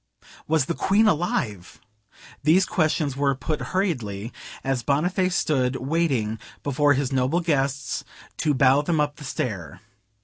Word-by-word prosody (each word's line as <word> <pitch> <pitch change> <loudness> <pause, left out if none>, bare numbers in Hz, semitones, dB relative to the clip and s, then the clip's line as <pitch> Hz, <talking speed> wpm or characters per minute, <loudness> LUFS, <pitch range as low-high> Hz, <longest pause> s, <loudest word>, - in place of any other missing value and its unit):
Was 155 -3 +2
the 170 - -1
Queen 200 +6 +3
alive? 120 - -1 0.6
These 170 +6 +4
questions 155 -7 0
were 140 0 +1
put 140 +3 -3
hurriedly, 125 - -2 0.3
as 135 -2 0
Boniface 180 +7 +1
stood 130 -4 +1
waiting 130 -7 0 0.2
before 145 +1 +3
his 140 0 -1
noble 130 +6 +2
guests 140 -5 -1 0.3
to 150 -2 +1
bow 135 +1 +5
them 160 +1 0
up 145 -1 0
the - - -10
stair. 105 - -4
140 Hz, 135 wpm, -24 LUFS, 130-160 Hz, 0.6 s, bow